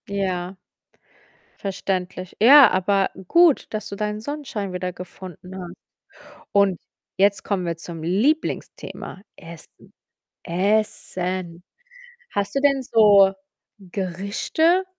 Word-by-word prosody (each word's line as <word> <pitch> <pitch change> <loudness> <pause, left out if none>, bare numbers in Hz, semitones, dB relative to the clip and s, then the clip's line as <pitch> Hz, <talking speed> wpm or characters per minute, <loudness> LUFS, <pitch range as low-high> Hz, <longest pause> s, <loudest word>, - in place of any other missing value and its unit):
Ja, 190 -2 -3 1.0
verständlich. 185 -2 -4
Ja, 265 +3 +9
aber 195 +1 +1 0.2
gut, 340 - +4
dass 215 -1 -4
du 200 - -6
deinen 210 +1 -3
Sonnenschein 230 -8 -5
wieder 180 0 -3
gefunden 180 0 -10
hast. 175 -1 -8 0.8
Und 200 -3 +3 0.4
jetzt 200 +1 +3
kommen 195 -3 -2
wir 170 -1 -2
zum 165 -1 -8
Lieblingsthema, 205 - -2
Essen, 165 -1 -13 0.5
Essen. 185 -2 -2 0.7
Hast 200 +3 -2
du - - +3
denn 275 -1 +3
so 205 -6 +5 0.5
Gerichte 200 - 0
195 Hz, 100 wpm, -22 LUFS, 180-215 Hz, 1.0 s, Ja